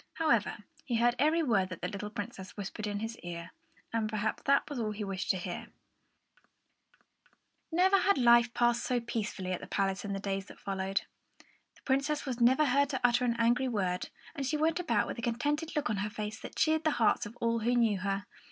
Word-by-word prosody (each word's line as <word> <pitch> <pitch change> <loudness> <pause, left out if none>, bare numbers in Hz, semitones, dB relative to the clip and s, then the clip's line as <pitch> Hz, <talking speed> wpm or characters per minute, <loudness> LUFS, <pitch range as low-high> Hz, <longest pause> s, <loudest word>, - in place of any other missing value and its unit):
However, 320 -1 +1 0.3
he 245 - -2
heard 240 +1 +4
every 315 +4 +3
word 200 -9 +2
that 185 - -8
the - - +1
little 205 +1 -5
Princess 205 -3 -7
whispered 210 +1 -4
in 205 0 -3
his 225 +1 -5
ear, 170 0 -7 0.4
and 220 -2 0
perhaps 215 0 -1
that 280 0 +4
was 285 -4 -4
all 220 -2 -1
that - - -11
he 215 - -3
wished 195 -2 -4
to 190 - +3
hear. 175 0 -5 2.0
Never 375 +4 +4
had 400 +2 +3
life 240 -1 +6
passed 240 0 +3
so 250 -1 +1
peacefully 215 -5 -3
at 180 - -2
the - - -8
palace 195 -1 0
as - - -7
in 200 - -3
the 195 - -2
days 195 -1 -3
that - - -13
followed. 195 0 -2 0.4
The - - -27
Princess 280 +3 +1
was 255 -3 -3
never 260 +6 +5
heard 280 +1 +3
to 265 -3 -2
utter 245 0 +4
an 235 -1 +1
angry 240 +3 +3
word, 185 -6 -1 0.2
and 285 -4 -4
she 285 +3 0
went 320 +3 +1
about 235 -12 +1
with - - -5
a - - -4
contented 290 +7 -1
look 300 0 +1
on 210 - -1
her 205 +2 -1
face 215 0 -5
that - - -9
cheered 315 0 +2
the 310 - +3
hearts 220 -2 +3
of 230 +3 -13
all 230 0 +1
who 240 +3 +1
knew 225 -5 +3
her. 195 0 -2
230 Hz, 220 wpm, -31 LUFS, 200-265 Hz, 2.0 s, life